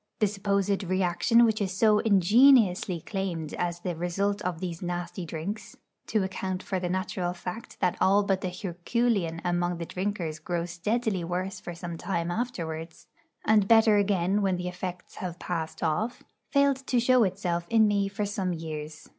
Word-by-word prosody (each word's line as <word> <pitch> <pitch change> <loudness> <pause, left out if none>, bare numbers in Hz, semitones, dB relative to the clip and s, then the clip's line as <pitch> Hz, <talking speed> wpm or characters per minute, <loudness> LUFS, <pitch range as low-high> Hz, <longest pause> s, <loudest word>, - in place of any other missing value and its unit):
The 215 - +3
supposed 200 0 0
reaction 185 +6 +3
which 220 -1 +1
is 190 -2 0
so 215 -1 +5
ingeniously 205 - +4
claimed 175 -6 -4
as 175 -1 -2
the 175 -1 -3
result 195 +5 -1
of 180 -3 -3
these 170 -2 -5
nasty 175 0 -4
drinks 170 +7 -5 0.3
to 215 -3 +1
account 190 0 -3
for 190 -2 -2
the 180 -1 -2
natural 185 -1 -2
fact 180 +5 -7
that 180 -1 +1
all 200 +2 +5
but 195 -1 0
the 185 - -2
herculean 180 0 -1
among 175 0 0
the 170 - -4
drinkers 180 -4 -3
grow 170 +1 -2
steadily 195 +3 -1
worse 180 +3 -3
for 175 - -7
some 170 -1 -6
time 170 -3 -2
afterwards, 170 -7 -4 0.4
and 210 -2 +4
better 225 -1 +6
again 200 -1 +2
when 190 -2 +1
the 180 0 -4
effects 180 0 -7
have 175 -2 -5
passed 165 -2 -4
off 210 +10 -1 0.3
failed 280 -1 +3
to 250 - +2
show 250 0 +4
itself 180 -3 -1
in 225 -1 +5
me 200 -1 +1
for 205 +1 -3
some 195 -3 -2
years. 155 -2 -6
185 Hz, 170 wpm, -28 LUFS, 175-205 Hz, 0.4 s, better